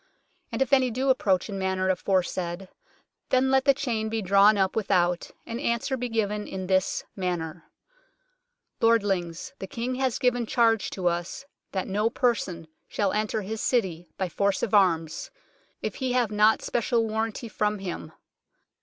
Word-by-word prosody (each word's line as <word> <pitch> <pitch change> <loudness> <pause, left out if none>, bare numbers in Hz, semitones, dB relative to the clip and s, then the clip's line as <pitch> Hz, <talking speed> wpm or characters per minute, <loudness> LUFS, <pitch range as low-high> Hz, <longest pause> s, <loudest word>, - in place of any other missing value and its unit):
And - - +2
if 265 - -5
any 260 -2 +5
do 260 +3 +1
approach 195 -8 +1
in 200 -2 -5
manner 190 0 0
aforesaid, 185 -1 -1 0.6
then 260 +1 +3
let 265 0 +3
the 275 - +6
chain 230 -6 -2
be 220 -1 -2
drawn 200 +3 +5
up 190 -1 +1
without, 180 -5 +1 0.2
and 230 +1 -5
answer 235 +3 0
be 250 -1 -3
given 210 -2 -1
in 190 -1 -5
this 190 0 +1
manner: 175 -3 -3 0.4
" - - -44
' - - -53
Lordlings, 205 -2 +1
the 190 - -5
King 235 +6 -3
has 260 -2 0
given 245 -2 +1
charge 225 -3 +2
to 185 - -6
us 175 +10 -2 0.3
that 190 - -2
no 210 +3 +1
person 205 -10 -1 0.2
shall 200 -2 0
enter 215 0 -1
his 220 +3 -4
city 180 -9 0
by 190 - -1
force 200 +3 0
of 215 - -1
arms, 165 -6 +2 0.5
if - - -2
he 260 -2 -1
have 245 -4 +1
not 210 +1 +4
special 235 -1 0
warranty 220 +2 -2
from 210 -1 -1
him. 180 -5 -6
210 Hz, 165 wpm, -26 LUFS, 190-235 Hz, 0.6 s, the